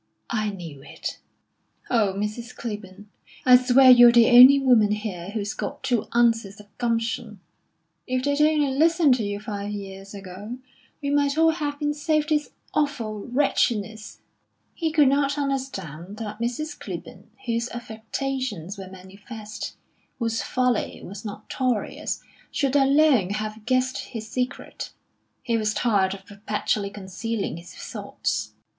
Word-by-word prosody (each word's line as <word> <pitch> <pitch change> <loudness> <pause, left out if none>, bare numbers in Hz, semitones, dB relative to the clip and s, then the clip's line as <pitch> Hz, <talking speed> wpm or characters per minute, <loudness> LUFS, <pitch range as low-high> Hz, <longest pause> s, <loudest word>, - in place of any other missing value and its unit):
"I 215 -2 0
knew 170 -8 -8
it." 140 - -7 0.7
"Oh, 210 -6 +2
Mrs. 215 +4 -4
Clibborn, 205 -2 -7 0.4
I 250 -1 +9
swear 255 +1 +7
you're 240 -1 +9
the 235 0 +6
only 255 +3 +10
woman 240 -6 +4
here 200 -4 -5
who's 205 -1 -3
got - - -5
two 240 -4 0
ounces 225 -4 +2
of 205 -1 -17
gumption. 230 -2 -1 0.7
If 255 0 -1
they'd 285 +1 +1
only 300 -3 +3
listened 325 -1 +4
to 225 - -2
you 205 0 -3
five 205 -2 -5
years 195 -1 -7
ago, 200 +5 -8 0.5
we 280 - 0
might 285 0 +2
all 325 0 +5
have 295 -3 -3
been 295 0 0
saved 305 0 0
this 300 -1 +1 0.2
awful 225 -8 -1
wretchedness." 225 -5 0 0.5
He 325 -2 -1
could 300 -3 +5
not 280 +1 +2
understand 210 - -4
that 215 -1 -6
Mrs. 250 +7 -3
Clibborn, - - -8 0.2
whose 235 +1 -1
affectations 225 -4 -4
were 190 -1 -8
manifest, 205 +3 -9 0.4
whose 230 -2 -1
folly 250 -3 0
was 200 +2 -8
notorious, 220 +3 -3 0.3
should 275 -2 0
alone 275 -7 +4
have 215 +1 -4
guessed 255 0 +1
his 220 -3 -7
secret. 250 +2 -4 0.5
He 230 -1 +1
was 215 -1 0
tired 195 -5 +2
of 190 -1 -14
perpetually 205 0 -2
concealing 200 0 -4
his 170 +1 -12
thoughts. - - -4
230 Hz, 140 wpm, -25 LUFS, 205-265 Hz, 0.7 s, only